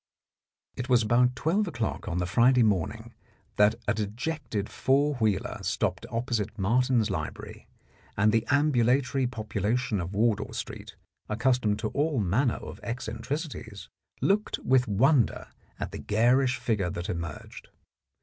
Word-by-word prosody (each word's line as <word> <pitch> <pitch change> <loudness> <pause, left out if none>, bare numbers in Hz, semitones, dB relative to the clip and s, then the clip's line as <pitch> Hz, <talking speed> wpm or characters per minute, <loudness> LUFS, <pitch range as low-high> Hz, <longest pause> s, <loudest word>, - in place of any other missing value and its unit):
It 125 +2 -5
was 120 -2 +4
about 125 +3 +3
twelve 190 +9 +1
o'clock 120 -9 -3
on 85 - -2
the 90 - 0
Friday 120 +6 +4
morning 100 -7 -1 0.4
that 105 +2 +5
a - - +3
dejected 110 0 -3
four 140 +3 +1
wheeler 105 -5 0
stopped - - -1
opposite 115 -3 -2
Martin's 115 +2 +2
Library, 75 -4 -6 0.5
and 105 +1 +4
the 115 0 +2
ambulatory 135 -2 +2
population 110 -2 -1
of 90 +3 -5
Wardour 105 -1 +1
Street, - - -7 0.3
accustomed 115 -1 +1
to 110 0 -2
all 145 0 0
manner 110 +6 +1
of - - -9
eccen 120 +2 -5
tricities, 140 - -5 0.3
looked 210 +2 +1
with 130 -1 +3
wonder 120 +5 +2 0.3
at - - -4
the - - -6
garish 125 +4 +2
figure 105 -8 -1
that 85 +1 -5
emerged. 85 -3 -6
115 Hz, 135 wpm, -27 LUFS, 105-130 Hz, 0.5 s, that